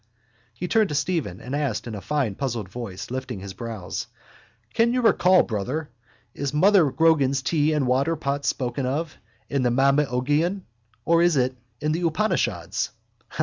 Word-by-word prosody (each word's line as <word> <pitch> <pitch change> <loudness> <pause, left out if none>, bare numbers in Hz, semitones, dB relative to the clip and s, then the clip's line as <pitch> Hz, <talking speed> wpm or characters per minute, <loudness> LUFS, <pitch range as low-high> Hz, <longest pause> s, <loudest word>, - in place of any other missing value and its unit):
He 180 - -4
turned 215 0 +3
to 150 - -3
Stephen 155 - -1
and 130 +3 -5
asked 140 -7 -1
in 115 - -6
a 105 - -6
fine 140 -6 -1
puzzled 120 -3 -3
voice, 105 0 -7
lifting 130 -4 -4
his 95 0 -7
brows: 110 -3 -5 0.7
—Can 235 +1 +3
you 250 - +1
recall, 185 -4 +5
brother, 125 +9 -3 0.4
is 140 0 -3
mother 185 -1 +5
Grogan's 140 -3 +3
tea 155 0 +2
and 150 -3 +1
water 135 +6 +2
pot 140 -2 -2
spoken 125 0 -1
of 155 +5 -2 0.3
in 140 - 0
the 125 - +2
Mabinogion 140 +7 +2 0.4
or 170 0 +4
is 170 -3 +3
it 130 0 +1 0.3
in 150 +1 0
the 165 +3 -1
Upanishads? 215 +7 -1
140 Hz, 160 wpm, -24 LUFS, 125-160 Hz, 0.7 s, recall